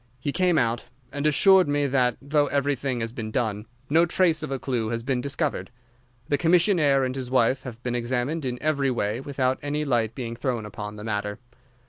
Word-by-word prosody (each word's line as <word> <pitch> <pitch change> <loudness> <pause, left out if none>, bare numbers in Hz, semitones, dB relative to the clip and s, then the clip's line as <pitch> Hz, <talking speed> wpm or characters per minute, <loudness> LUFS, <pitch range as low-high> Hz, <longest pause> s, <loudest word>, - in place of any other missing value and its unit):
He 140 +3 -2
came 180 +1 +2
out, 115 -2 0 0.3
and 145 +1 -1
assures 185 +4 +6
me 145 0 +1
that, 125 -3 +1
though 145 +1 +1
everything 140 -3 -1
has 115 0 -3
been 115 -3 -5
done, 110 -3 -2 0.2
no 165 +5 +4
trace 170 -3 +2
of - - -4
a 135 - -2
clue 120 -4 -2
has 115 0 -3
been 130 -1 -1
discovered. 140 +2 -2 0.6
The 145 - +1
commissionnaire 165 -5 +3
and 130 0 -2
his 130 -2 -5
wife 130 0 +2
have 125 -2 -9
been 120 - -2
examined 125 +6 -1
in 125 -2 -3
every 140 -3 +1
way 115 -2 -1
without 130 -1 -1
any 150 +1 -2
light 115 -5 0
being 115 -3 -5
thrown 120 -2 -2
upon 105 0 -7
the 105 - -9
matter. 105 -1 -3
130 Hz, 195 wpm, -25 LUFS, 120-145 Hz, 0.6 s, assures